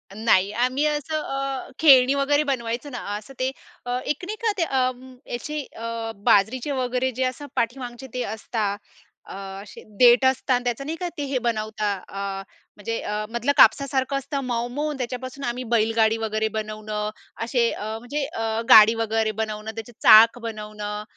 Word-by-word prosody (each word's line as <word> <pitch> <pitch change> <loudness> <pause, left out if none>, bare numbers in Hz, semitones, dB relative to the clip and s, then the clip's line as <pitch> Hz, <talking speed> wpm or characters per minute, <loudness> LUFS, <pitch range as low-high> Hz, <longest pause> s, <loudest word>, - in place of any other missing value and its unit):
नाही 205 -3 +3
आम्ही 255 +6 0
असं 300 +1 -1
अ, 275 -1 -4
खेळणी 270 -4 +7
वगैरे 290 +2 +2
बनवायचं 250 0 -3
ना, 245 - -5 0.2
असं 215 +6 -12
ते 255 - +1 0.6
एक 300 - -2
नाही 425 +4 -4
का 440 - +4 0.3
अ, 255 0 +2 0.4
याची 300 +5 -4
अ, 230 0 -4
बाजरीचे 220 +7 +2
वगैरे 255 -1 -1
जे 255 +2 -2
असं 255 +3 -3
पाठीमागचे 245 +1 -3
ते 250 -1 -2
असतात. 215 -2 -3 0.5
अ, - - -10 0.3
असे 205 - -12 0.2
देठ 245 +1 +7
असतं 260 0 +2
अन् 245 0 +1
त्याचं 245 +3 -2
नाही 320 +2 -3
का, 355 0 -3
ते 290 - -2
हे 260 - +1
बनवता 215 -2 -1
अ, 195 0 -4 0.3
म्हणजे 225 +2 -4
अ, 210 +1 -3
मधलं 235 +4 0
कापसासारखं 275 0 +4
असतं 275 +1 -3
मऊ-मऊ 245 +5 -2
अन् 295 - -5
त्याच्यापासून 255 +2 -5
आम्ही 245 +1 -3
बैलगाडी 225 0 +3
वगैरे 220 -1 -1
बनवणं. 215 0 -4 0.3
असे 235 -1 +1
अ, 215 +1 -5
म्हणजे 280 +4 -3
अ, 225 -5 -2
गाडी 220 +1 +9
वगैरे 225 -1 0
बनवणं, 215 0 -4
त्याचे 225 +1 -7
चाक 225 +2 +8
बनवणं. 210 -2 -6
240 Hz, 160 wpm, -24 LUFS, 220-265 Hz, 0.6 s, गाडी